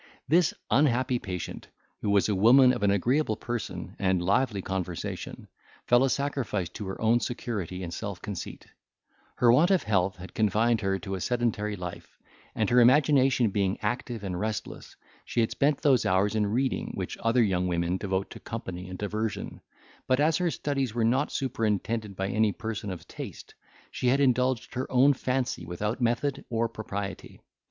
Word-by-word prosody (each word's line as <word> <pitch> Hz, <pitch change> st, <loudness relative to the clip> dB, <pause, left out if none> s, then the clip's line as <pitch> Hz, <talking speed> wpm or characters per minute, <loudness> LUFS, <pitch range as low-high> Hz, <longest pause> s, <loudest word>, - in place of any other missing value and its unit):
This 170 Hz, +1 st, +4 dB, 0.2 s
unhappy 130 Hz, -3 st, +3 dB
patient, 90 Hz, -5 st, -6 dB, 0.3 s
who 105 Hz, -, -1 dB
was 100 Hz, -1 st, +3 dB
a 105 Hz, -, +1 dB
woman 125 Hz, +6 st, +6 dB
of -, -, -4 dB
an 100 Hz, -, +3 dB
agreeable 115 Hz, +5 st, +1 dB
person 120 Hz, -1 st, -5 dB
and 95 Hz, -2 st, +2 dB
lively 100 Hz, +4 st, +1 dB
conversation, 90 Hz, -3 st, -5 dB, 0.4 s
fell 120 Hz, +1 st, +5 dB
a 135 Hz, -, +3 dB
sacrifice 125 Hz, -, -1 dB
to 105 Hz, -, -7 dB
her 95 Hz, -, -5 dB
own 115 Hz, +2 st, +3 dB
security 100 Hz, -8 st, -4 dB
and 85 Hz, -1 st, -5 dB
self 100 Hz, -1 st, -5 dB
conceit; 100 Hz, -5 st, -7 dB, 0.7 s
her 120 Hz, -1 st, +5 dB
want 160 Hz, +8 st, +5 dB
of 190 Hz, -3 st, +3 dB
health 95 Hz, -3 st, +1 dB
had 90 Hz, +1 st, -11 dB
confined 110 Hz, +2 st, +2 dB
her 95 Hz, -1 st, 0 dB
to 95 Hz, +2 st, -6 dB
a 95 Hz, -, -3 dB
sedentary 115 Hz, -3 st, -1 dB
life, 90 Hz, -2 st, -8 dB, 0.4 s
and 110 Hz, -1 st, 0 dB
her 125 Hz, -, +6 dB
imagination 130 Hz, -2 st, +4 dB
being 95 Hz, -1 st, 0 dB
active 120 Hz, 0 st, -2 dB
and 90 Hz, -2 st, -3 dB
restless, 110 Hz, +1 st, -5 dB, 0.3 s
she 120 Hz, -, 0 dB
had 115 Hz, -, 0 dB
spent 145 Hz, 0 st, +1 dB
those 135 Hz, -5 st, +4 dB
hours 95 Hz, +3 st, +2 dB
in 105 Hz, -2 st, +1 dB
reading 125 Hz, +6 st, -1 dB
which -, -, -4 dB
other 115 Hz, +1 st, +3 dB
young 90 Hz, -3 st, +1 dB
women 85 Hz, +1 st, 0 dB
devote 95 Hz, 0 st, -2 dB
to -, -, -9 dB
company 95 Hz, -5 st, -6 dB
and 90 Hz, -, -6 dB
diversion, 105 Hz, +2 st, -3 dB, 0.5 s
but, 130 Hz, +1 st, +2 dB
as 155 Hz, +2 st, +3 dB
her 180 Hz, -1 st, +1 dB
studies 135 Hz, -7 st, -2 dB
were 115 Hz, -, +1 dB
not 120 Hz, +3 st, +1 dB
superintended 110 Hz, -4 st, -1 dB
by 95 Hz, +1 st, -2 dB
any 110 Hz, 0 st, +2 dB
person 105 Hz, 0 st, -5 dB
of 90 Hz, -3 st, -7 dB
taste, -, -, -9 dB, 0.4 s
she 125 Hz, -, -2 dB
had 135 Hz, +3 st, +3 dB
indulged 130 Hz, -2 st, +1 dB
her 130 Hz, +1 st, -4 dB
own 130 Hz, +3 st, +5 dB
fancy 130 Hz, -1 st, -2 dB
without 105 Hz, +8 st, -3 dB
method 125 Hz, +4 st, 0 dB
or 115 Hz, 0 st, 0 dB
propriety. 100 Hz, -3 st, -6 dB
110 Hz, 175 wpm, -28 LUFS, 95-125 Hz, 0.7 s, woman